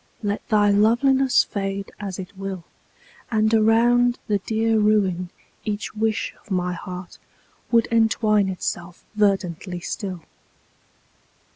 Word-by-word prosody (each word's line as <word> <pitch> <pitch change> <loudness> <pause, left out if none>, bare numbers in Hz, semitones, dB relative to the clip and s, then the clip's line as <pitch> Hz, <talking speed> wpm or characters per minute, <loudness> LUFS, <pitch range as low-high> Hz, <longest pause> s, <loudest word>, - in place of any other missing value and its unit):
Let 205 0 -1
thy 205 -2 +4
loveliness 245 +5 +4
fade 195 -1 -4
as 195 -3 -5
it 190 +1 -8
will. 190 -2 -5 0.7
And 220 -1 +2
around 240 +2 +4
the 205 -1 0
dear 220 +2 +1
ruin 195 -4 +2 0.3
each 210 -1 -4
wish 220 0 -1
of - - -25
my 180 -2 -1
heart 180 +1 -8 0.5
Would 230 -1 +3
entwine 220 -3 +3
itself 175 -1 -5
verdantly 190 -3 0
still. 185 -3 -5
205 Hz, 115 wpm, -23 LUFS, 190-225 Hz, 0.7 s, thy